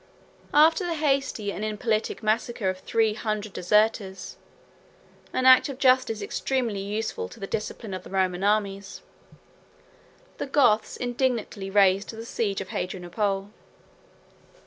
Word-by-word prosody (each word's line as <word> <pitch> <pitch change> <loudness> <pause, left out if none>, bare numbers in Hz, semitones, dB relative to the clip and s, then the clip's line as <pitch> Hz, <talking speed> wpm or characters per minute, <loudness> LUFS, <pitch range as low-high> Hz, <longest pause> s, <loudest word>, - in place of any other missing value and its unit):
After 320 +5 +5
the 345 -2 -2
hasty 275 -8 0
and 205 - -5
impolitic 215 +1 -2
massacre 215 -2 0
of 185 - -10
three 220 +2 +1
hundred 215 -2 -3
deserters, 200 -1 0 1.0
an 255 - -1
act 260 +2 +7
of 270 - -6
justice 255 -5 +3
extremely 235 -2 -2
useful 205 - -3
to - - -13
the 195 - -4
discipline 210 0 -5
of 185 - -4
the - - -13
Roman 185 -1 0
armies, 200 -1 -1 1.4
the - - -3
Goths 255 -6 +2
indignantly 245 -5 -2
raised 195 0 +3
the 225 0 -7
siege 205 -4 -2
of 190 - -8
Hadrianople. 195 +2 -3
215 Hz, 125 wpm, -26 LUFS, 195-245 Hz, 1.4 s, act